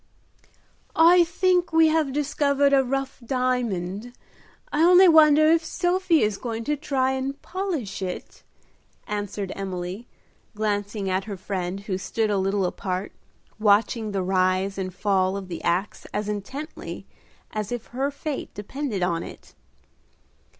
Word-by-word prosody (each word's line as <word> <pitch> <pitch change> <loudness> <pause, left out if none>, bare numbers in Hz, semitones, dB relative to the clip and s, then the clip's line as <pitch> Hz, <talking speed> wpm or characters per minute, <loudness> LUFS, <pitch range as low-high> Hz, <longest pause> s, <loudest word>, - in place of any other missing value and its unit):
"I 345 +2 +7
think 355 +1 +1
we 320 0 +5
have 310 -3 +1
discovered 280 0 +1
a 270 -1 +5
rough 270 +1 -3
diamond. 240 -4 -2 0.6
I 300 - +2
only 360 +2 +7
wonder 310 -1 +6
if 330 0 +3
Sophie 350 0 +1
is 210 -2 0
going 230 -2 -4
to 295 +5 0
try 265 -2 0
and 265 +1 -3
polish 340 - -3
it," 185 -1 -6 0.6
answered 205 -2 -4
Emily, 190 +3 -5 0.5
glancing 205 -1 -2
at 190 +1 0
her 205 -3 -6
friend, 185 0 -4
who 195 -2 -3
stood 220 +2 -1
a 200 - +1
little 195 0 +1
apart, 185 +1 -3 0.5
watching 215 +1 +2
the 195 -2 -1
rise 185 +1 +1
and 185 -1 -3
fall 190 0 +1
of 190 -2 -7
the 170 - -6
axe 180 +4 -1
as 210 0 -2
intently 210 +9 -6 0.5
as 210 0 -4
if 240 -1 -4
her 270 +3 0
fate 285 0 -5
depended 210 -1 -3
on 170 -2 0
it. - - -11
220 Hz, 140 wpm, -24 LUFS, 195-285 Hz, 0.6 s, I